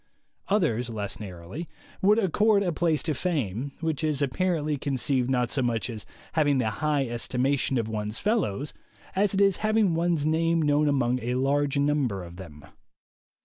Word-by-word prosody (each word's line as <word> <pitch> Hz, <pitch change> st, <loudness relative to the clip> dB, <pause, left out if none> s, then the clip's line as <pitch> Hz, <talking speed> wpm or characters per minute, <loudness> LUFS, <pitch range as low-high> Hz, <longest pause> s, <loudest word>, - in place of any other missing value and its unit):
Others, 140 Hz, -, +1 dB
less 105 Hz, -3 st, -5 dB
narrow, 90 Hz, -4 st, -9 dB, 0.5 s
would 205 Hz, +3 st, +5 dB
accord 205 Hz, +1 st, +3 dB
a 180 Hz, -, 0 dB
place 160 Hz, -1 st, +1 dB
to 160 Hz, -, 0 dB
fame, 140 Hz, -, -2 dB
which 160 Hz, -1 st, -1 dB
is 155 Hz, -3 st, +1 dB
apparently 150 Hz, +2 st, 0 dB
conceived 130 Hz, -2 st, 0 dB
not 125 Hz, -2 st, +1 dB
so 135 Hz, -, 0 dB
much 120 Hz, -1 st, -1 dB
as 110 Hz, -2 st, -7 dB, 0.3 s
having 145 Hz, -3 st, +3 dB
the 110 Hz, -4 st, +1 dB
high 150 Hz, -3 st, +1 dB
estimation 130 Hz, +3 st, 0 dB
of 115 Hz, -2 st, -1 dB
one's 105 Hz, 0 st, -3 dB
fellows, 150 Hz, -, -1 dB, 0.4 s
as 200 Hz, 0 st, +2 dB
it 195 Hz, -, +2 dB
is 195 Hz, -2 st, +4 dB
having 215 Hz, -4 st, +2 dB
one's 165 Hz, -2 st, +1 dB
name 165 Hz, +1 st, +2 dB
known 150 Hz, -1 st, +2 dB
among 130 Hz, -3 st, +1 dB
a 125 Hz, +2 st, -2 dB
large 140 Hz, +2 st, +1 dB
number 140 Hz, -9 st, +1 dB
of 85 Hz, 0 st, -11 dB
them. 75 Hz, -6 st, -11 dB
145 Hz, 165 wpm, -26 LUFS, 120-165 Hz, 0.5 s, would